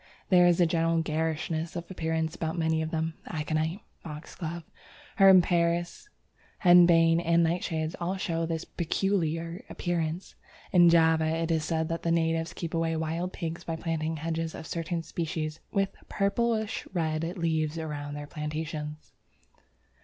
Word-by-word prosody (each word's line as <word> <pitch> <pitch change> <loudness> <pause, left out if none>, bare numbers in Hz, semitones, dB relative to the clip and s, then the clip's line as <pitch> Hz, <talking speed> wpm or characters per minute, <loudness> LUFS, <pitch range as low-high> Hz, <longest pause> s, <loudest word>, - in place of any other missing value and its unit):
There 180 -2 +6
is 175 0 +3
a 175 - +6
general 165 0 +1
garishness 160 +1 -2
of 170 +1 -6
appearance 160 -2 -1
about 160 +1 -3
many 160 -1 +1
of 160 - -2
them. 160 0 -2
Aconite, 160 +3 -2 0.2
Foxglove, 160 +2 -7 0.5
Herb 190 -2 +8
Paris, 170 - 0 0.5
Henbane, 170 -2 +6
and 170 0 +3
Nightshades 160 -1 -1
all 180 +3 -1
show 165 -3 -1
this 165 0 -3
peculiar 170 -1 -1
appearance. 170 0 -2 0.4
In 175 -2 +7
Java 160 -1 +4
it 165 +1 0
is 160 -1 +1
said 160 0 -1
that 165 0 -2
the 165 - 0
natives 165 0 +1
keep 170 -2 -5
away 165 0 0
wild 165 +3 -2
pigs 165 -2 -5
by 165 - -3
planting 160 -1 -2
hedges 165 +1 -3
of - - -8
certain 165 +1 -3
species 155 -2 -3
with 195 -2 0
purplish 220 +2 0
red 160 -4 -1 0.2
leaves 160 -2 0
around 145 -2 -5
their 145 0 -6
plantations. 150 0 -5
165 Hz, 145 wpm, -28 LUFS, 160-170 Hz, 0.5 s, Herb